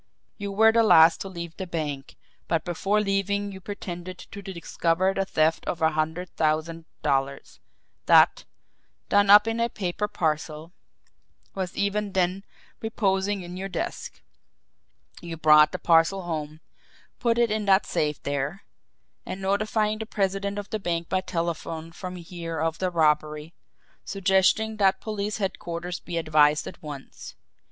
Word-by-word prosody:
You 200 -1 -4
were 220 +3 +5
the 230 +1 +4
last 165 -6 +6
to - - -4
leave 170 -2 -7
the 190 - -5
bank, 150 -5 -4 0.3
but 165 -1 0
before 195 +4 0
leaving 200 0 -1
you 190 -1 -10
pretended 185 -2 -7
to 200 +2 -10
discover 185 -1 -1
the 195 0 -1
theft 160 -3 +1
of 170 - -2
a 160 -1 +3
hundred 160 +4 -2
thousand 160 +1 -1 0.2
dollars 135 0 -1 0.5
that, - - +6 0.7
done 205 0 +4
up 210 +2 +8
in 225 +1 -1
a 235 0 +1
paper 200 0 -3
parcel, 155 -2 -2 0.8
was 185 -2 -4
even 200 0 -1
then 185 +1 0 0.4
reposing 200 -3 0
in 175 +1 -8
your 195 +1 -4
desk. 180 - -5 1.0
You 170 -1 -7
brought 150 -1 +6
the - - -3
parcel 170 +3 +3
home, 155 -2 -5 0.6
put 235 -2 +1
it 235 -2 +2
in 215 -1 -1
that 195 0 +4
safe 150 -1 -2
there 140 +6 -3 0.6
and 190 - -6
notified 215 +2 0
the 220 - -5
president 200 -1 -1
of 205 0 -6
the 215 - -2
bank 170 -3 -2
by 185 - +1
telephone 165 -2 -4
from 180 +1 -7
here 170 -2 -6
of 165 0 -1
the 185 - 0
robbery, 155 -1 0 0.5
suggesting 195 +3 +2
that 190 -2 +3
police 210 -1 -3
headquarters 175 -3 -4
be 170 - -5
advised 155 -2 +3
at - - -9
once. 145 -3 -9
180 Hz, 150 wpm, -25 LUFS, 160-200 Hz, 1.0 s, up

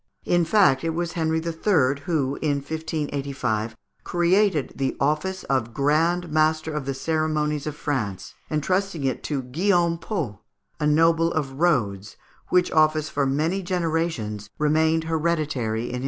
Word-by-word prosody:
In 175 -1 +2
fact, 165 -7 +4
it 165 -1 -1
was 170 0 -2
Henri 160 -1 0
III. 160 -4 +1
who, 140 -5 0
in 150 -2 +1
1585, 140 -7 -3 0.3
created 175 -2 +2
the 135 0 -2
office 155 +7 0
of 120 -4 -1
Grand 165 +4 +1
Master 155 0 +1
of 150 -3 -3
the 135 - -2
Ceremonies 155 0 -1
of 150 - -4
France, 120 -11 -3 0.2
entrusting 180 +2 -1
it 130 -2 -1
to 140 -3 -2
Guillaume 170 +5 +1
Pot, 150 - -4 0.4
a 150 - +1
noble 165 +2 +3
of 140 -4 -3
Rhodes, 110 - 0 0.3
which 180 -1 +3
office 155 -1 +3
for 140 -1 0
many 160 +8 0
generations 165 - -2
remained 160 +2 +2
hereditary 155 -9 -1
in 120 - -4
his - - -6
family. 125 - -3
155 Hz, 145 wpm, -24 LUFS, 135-165 Hz, 0.4 s, fact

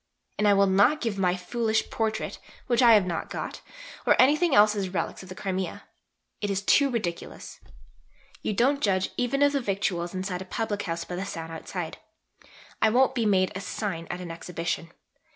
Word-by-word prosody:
And 210 - +3
I 205 - +6
will 200 0 +5
not 200 +10 +4
give 225 -6 -2
my 180 -1 +2
foolish 220 +4 -1
Portrait 220 -1 -2 0.3
(which 240 -1 +2
I 235 -2 +8
have 205 -3 +4
not 170 -2 -3
got) - - -5 0.4
or - - +3
anything 300 +4 +4
else 210 +1 +6
as 195 -2 -2
'relics' 180 - -3
of 185 - -12
the 185 - -8
Crimea. 190 -2 -3 0.6
It 205 - -1
is 195 0 -1
too 280 +6 +4
ridiculous. 205 -9 -5 0.8
You - - -1
don't 270 +7 +2
judge 190 -4 +1
even 275 +3 +1
of 285 - +5
the 280 -1 0
victuals 190 -4 -2
inside 185 -1 -3
a - - -6
public 210 +1 -2
house 165 -2 -3
by 175 - -5
the 190 - -2
sign 165 -3 -6
outside. 165 +1 -6 0.8
I - - +5
won't 260 +4 +3
be 235 -4 0
made 185 -2 +3
a 190 - -5
sign 185 -4 -4
at 180 - -4
an 175 -2 -6
Exhibition. 165 0 -4
200 Hz, 190 wpm, -27 LUFS, 180-230 Hz, 0.8 s, I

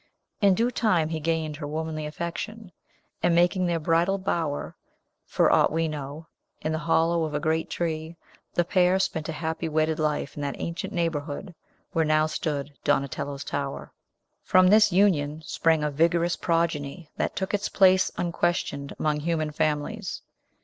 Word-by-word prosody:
In 200 -2 +5
due 235 +5 +1
time 180 -10 +2
he 160 -1 -2
gained 160 -1 -1
her 145 -1 -5
womanly 155 0 -3
affection; 180 +6 -5 0.5
and, 170 - +3
making 175 +1 +3
their 170 -1 0
bridal 170 +5 +2
bower, 165 -6 -2 0.5
for - - +3
aught - - +4
we 165 +1 +1
know, 150 +1 -6 0.4
in 155 - -1
the 160 - -1
hollow 165 +1 +2
of 155 -2 -3
a - - +1
great 160 +1 0
tree, 160 -1 -3 0.4
the 175 - +2
pair 180 +1 +3
spent 160 -4 -1
a - - 0
happy 160 +1 -3
wedded 155 0 +1
life 150 -2 -1
in 145 - -5
that 140 -1 -2
ancient 175 +4 -4
neighborhood 165 -1 -3 0.4
where 165 - +2
now 155 0 +3
stood 150 -2 -3
Donatello's 140 0 -1
tower. 140 -1 -4 0.5
From 185 0 +4
this 210 0 +6
union 160 -5 +2
sprang 160 +1 +2
a 150 - 0
vigorous 170 +3 +2
progeny 165 -2 -1
that - - -1
took 190 +1 -3
its 205 0 0
place 190 -1 +5
unquestioned 170 -5 -1
among 150 -1 0
human 155 -1 -1
families. 155 +7 -2
160 Hz, 160 wpm, -26 LUFS, 150-175 Hz, 0.5 s, this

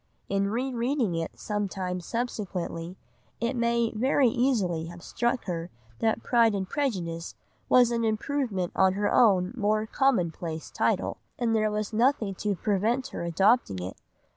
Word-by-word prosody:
In 200 0 +1
re 255 +5 -1
reading 240 -4 0
it 165 -1 -4
some 205 -1 -2
time 180 -1 -3
subsequently 185 -5 -4 0.4
it 235 +3 -1
may 235 -1 +1
very 255 +3 +3
easily 215 -10 +1
have 175 0 -10
struck 240 +1 -1
her 170 -2 -3 0.3
that 220 - +1
"Pride 230 -3 +4
and 190 -1 -2
Prejudice" 180 - -2 0.3
was 245 -1 +6
an 230 -1 0
improvement 220 -4 -1
on 190 -1 +4
her 205 +1 0
own 190 -5 +4
more 215 -1 +1
common 230 - +2
place 160 -1 -6
title, - - 0 0.2
and 235 -2 +1
there 215 -1 +2
was 210 +1 -3
nothing 230 -3 +2
to 205 +2 -2
prevent 220 +7 0
her - - -5
adopting 180 - +2
it. 90 +1 -5
215 Hz, 155 wpm, -27 LUFS, 180-240 Hz, 0.4 s, was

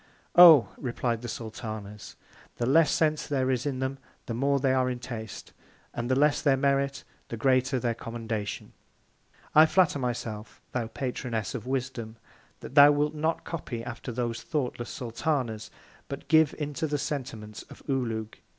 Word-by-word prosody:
Oh! 165 -7 +9
replied 120 -2 -2
the 120 - -6
Sultanas, 110 -3 -7 0.4
the 120 - -1
less 150 +4 +5
Sense 155 -1 +1
there 130 -3 0
is 130 +2 -1
in 135 -2 -2
them, 130 +1 -3 0.3
the 115 - -4
more 140 +4 +1
they 130 -1 +2
are 130 -1 +2
in 125 - -3
Taste; 120 -3 -8 0.4
and 120 +1 -3
the 130 - +3
less 145 +2 +3
their 140 -3 +3
Merit, 140 0 0 0.2
the 115 - -6
greater 130 +2 +2
their 120 -1 0
Commendation. 115 -3 -5 0.8
I 155 +1 +8
flatter 170 -4 +3
my 125 -2 0
self, 110 -2 -7
thou 120 -3 -2
Patroness 120 -4 -3
of 125 -1 -6
Wisdom, 130 -4 -3 0.5
that - - -9
thou 145 0 +9
wilt 145 +1 +1
not 160 +2 -1
copy 125 -8 -5
after 120 +1 -6
those 120 -1 -3
thoughtless 140 -7 -3
Sultanas, 120 -3 -2 0.4
but 140 -1 -7
give 160 -1 +4
into 150 +1 -3
the 145 0 -1
Sentiments 125 -7 -5
of - - -13
OULOUG. 115 -5 -2
130 Hz, 160 wpm, -28 LUFS, 115-140 Hz, 0.8 s, Oh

